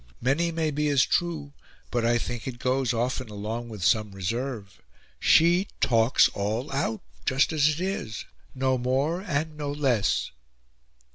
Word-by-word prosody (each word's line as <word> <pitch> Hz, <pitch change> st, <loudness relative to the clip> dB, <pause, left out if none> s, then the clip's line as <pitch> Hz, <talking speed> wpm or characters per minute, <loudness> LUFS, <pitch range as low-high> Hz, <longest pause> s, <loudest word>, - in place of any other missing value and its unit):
Many 150 Hz, +8 st, +1 dB
may 160 Hz, -1 st, -1 dB
be 150 Hz, +1 st, 0 dB
as 140 Hz, -3 st, +4 dB
true, 160 Hz, -5 st, -1 dB, 0.4 s
but 120 Hz, -1 st, 0 dB
I 120 Hz, +1 st, +3 dB
think 120 Hz, 0 st, -5 dB
it 125 Hz, -2 st, -5 dB
goes 130 Hz, 0 st, 0 dB
often 125 Hz, +1 st, -2 dB
along 110 Hz, +3 st, -5 dB
with 105 Hz, -5 st, -7 dB
some 105 Hz, +3 st, +2 dB
reserve. 105 Hz, +1 st, -4 dB, 0.4 s
She 175 Hz, +4 st, +4 dB
talks 115 Hz, +1 st, +4 dB
all 110 Hz, +8 st, -3 dB
out; 135 Hz, -5 st, -1 dB, 0.2 s
just 135 Hz, +5 st, +2 dB
as 150 Hz, -1 st, +4 dB
it 155 Hz, +1 st, -2 dB
is, 180 Hz, -, -3 dB, 0.3 s
no 130 Hz, -1 st, +1 dB
more 135 Hz, +8 st, 0 dB
and 155 Hz, -4 st, -2 dB
no 145 Hz, -1 st, -3 dB
less." 135 Hz, -8 st, +1 dB
130 Hz, 150 wpm, -26 LUFS, 115-150 Hz, 0.4 s, as